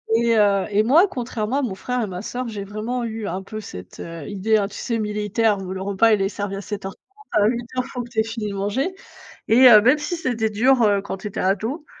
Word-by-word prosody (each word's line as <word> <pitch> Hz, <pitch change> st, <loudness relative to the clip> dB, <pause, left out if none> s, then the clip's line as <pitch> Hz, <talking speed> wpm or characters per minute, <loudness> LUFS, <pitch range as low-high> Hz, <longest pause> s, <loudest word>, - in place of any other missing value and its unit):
Et 230 Hz, 0 st, +3 dB
heu, 200 Hz, -2 st, +3 dB
et 210 Hz, +1 st, +2 dB
moi, 315 Hz, -, +5 dB
contrairement 245 Hz, -, -3 dB
à -, -, 0 dB
mon 230 Hz, -8 st, -3 dB
frère 250 Hz, +5 st, -2 dB
et 215 Hz, -, -1 dB
ma 180 Hz, 0 st, -6 dB
sœur, 245 Hz, +3 st, -4 dB
j'ai 210 Hz, -3 st, -5 dB
vraiment 215 Hz, +5 st, -4 dB
eu 225 Hz, -2 st, -4 dB
un 185 Hz, +3 st, -4 dB
peu 215 Hz, +3 st, -7 dB
cette, 90 Hz, -, -10 dB
heu, 165 Hz, -3 st, -7 dB
idée, 205 Hz, +2 st, +1 dB
hein, 200 Hz, -2 st, 0 dB
tu 205 Hz, -, -10 dB
sais 235 Hz, -2 st, -2 dB
militaire, 210 Hz, 0 st, 0 dB
où 185 Hz, -1 st, -6 dB
le 190 Hz, -, -5 dB
repas 200 Hz, +3 st, +3 dB
il 205 Hz, -, +2 dB
est 195 Hz, -, +1 dB
servi 200 Hz, -1 st, -4 dB
à 195 Hz, -, -5 dB
7:30, 205 Hz, -, -9 dB
à 210 Hz, -1 st, +4 dB
8:00 240 Hz, +2 st, -2 dB
il -, -, -11 dB
faut 250 Hz, -, -4 dB
que 235 Hz, -, -12 dB
tu 225 Hz, -, -2 dB
aies 220 Hz, -, +4 dB
fini 225 Hz, -1 st, -4 dB
de 200 Hz, -, -5 dB
manger. 255 Hz, -, -1 dB, 0.5 s
Et 250 Hz, +3 st, +7 dB
heu, 215 Hz, -3 st, +9 dB
même 255 Hz, +6 st, +4 dB
si 315 Hz, +4 st, -3 dB
c'était 235 Hz, -7 st, -1 dB
dur, 245 Hz, +4 st, +3 dB
heu, 205 Hz, -2 st, +3 dB
quand 195 Hz, -1 st, -6 dB
j'étais 205 Hz, -1 st, -5 dB
ado, 220 Hz, -, -1 dB
215 Hz, 255 wpm, -22 LUFS, 200-245 Hz, 0.5 s, heu